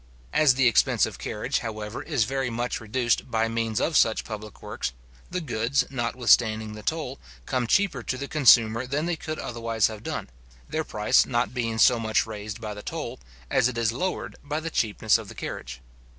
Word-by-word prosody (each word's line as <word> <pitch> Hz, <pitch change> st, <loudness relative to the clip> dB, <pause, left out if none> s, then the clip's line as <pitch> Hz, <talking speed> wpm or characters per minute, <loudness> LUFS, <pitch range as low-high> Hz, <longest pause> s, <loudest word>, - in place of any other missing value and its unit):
As 145 Hz, -5 st, +5 dB
the 135 Hz, -1 st, +4 dB
expense 115 Hz, -, +4 dB
of -, -, -8 dB
carriage, -, -, -2 dB
however, 110 Hz, -1 st, -5 dB
is 145 Hz, -7 st, 0 dB
very 135 Hz, +3 st, -1 dB
much 120 Hz, +1 st, -2 dB
reduced 120 Hz, +3 st, 0 dB
by 115 Hz, -1 st, +1 dB
means 115 Hz, -1 st, -1 dB
of 160 Hz, -, 0 dB
such 110 Hz, -5 st, +4 dB
public 110 Hz, -2 st, -8 dB
works, -, -, -4 dB, 0.4 s
the 180 Hz, 0 st, -2 dB
goods, 125 Hz, -2 st, 0 dB
notwithstanding 115 Hz, -3 st, +2 dB
the 105 Hz, -, -8 dB
toll, 145 Hz, 0 st, -3 dB, 0.3 s
come 125 Hz, -3 st, -1 dB
cheaper 175 Hz, -, +2 dB
to 130 Hz, -, -3 dB
the 140 Hz, +2 st, -5 dB
consumer 120 Hz, -5 st, +5 dB
than 145 Hz, +4 st, -1 dB
they 175 Hz, 0 st, 0 dB
could 155 Hz, -1 st, -5 dB
otherwise 115 Hz, -2 st, -1 dB
have 110 Hz, -1 st, -8 dB
done, -, -, -5 dB, 0.4 s
their -, -, -2 dB
price -, -, +3 dB
not 120 Hz, +1 st, 0 dB
being 115 Hz, -3 st, -2 dB
so 120 Hz, +1 st, +5 dB
much 110 Hz, -1 st, +1 dB
raised 105 Hz, -1 st, -6 dB
by 110 Hz, -2 st, -5 dB
the 105 Hz, -, -8 dB
toll, -, -, -5 dB, 0.3 s
as -, -, +4 dB
it 125 Hz, -2 st, -4 dB
is 115 Hz, -1 st, +2 dB
lowered 180 Hz, +10 st, -3 dB
by 150 Hz, +2 st, -2 dB
the 165 Hz, +1 st, -5 dB
cheapness 110 Hz, -2 st, +2 dB
of 110 Hz, -, -9 dB
the -, -, -10 dB
carriage. 60 Hz, 0 st, -6 dB
115 Hz, 195 wpm, -26 LUFS, 110-135 Hz, 0.4 s, As